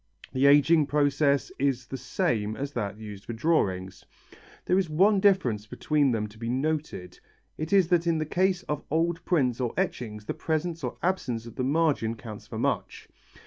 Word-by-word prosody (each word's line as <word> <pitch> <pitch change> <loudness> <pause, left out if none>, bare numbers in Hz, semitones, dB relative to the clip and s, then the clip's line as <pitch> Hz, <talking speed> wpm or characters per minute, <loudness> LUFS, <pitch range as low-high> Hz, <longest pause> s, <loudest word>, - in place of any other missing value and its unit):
The 130 +2 +3
ageing 145 +2 +5
process 145 -1 +2
is 130 -2 0
the 135 - -7
same 110 -4 -1
as 140 +1 -4
that 105 -5 -3
used 105 -2 -9
for 120 - -5
drawings. 95 - 0 0.6
There 185 - +3
is 185 -4 -1
one 195 +6 +4
difference 135 - +2
between 145 +4 +1
them 110 -2 -1
to 110 +1 -17
be 115 0 -4
noted, 135 - -3 0.4
it 155 +1 -5
is 190 -4 +4
that 170 -1 +2
in 165 -1 +2
the 155 - -1
case 185 +3 +1
of 150 -1 -4
old 165 +2 0
prints 130 -8 +1
or 120 -2 -2
etchings 105 -3 -3
the - - -3
presence 165 0 -2
or 125 - -4
absence 130 -11 -1
of 115 - -9
the 130 - -3
margin 140 -5 +1
counts 110 -2 -10
for - - -7
much. - - -2
140 Hz, 185 wpm, -27 LUFS, 115-165 Hz, 0.6 s, ageing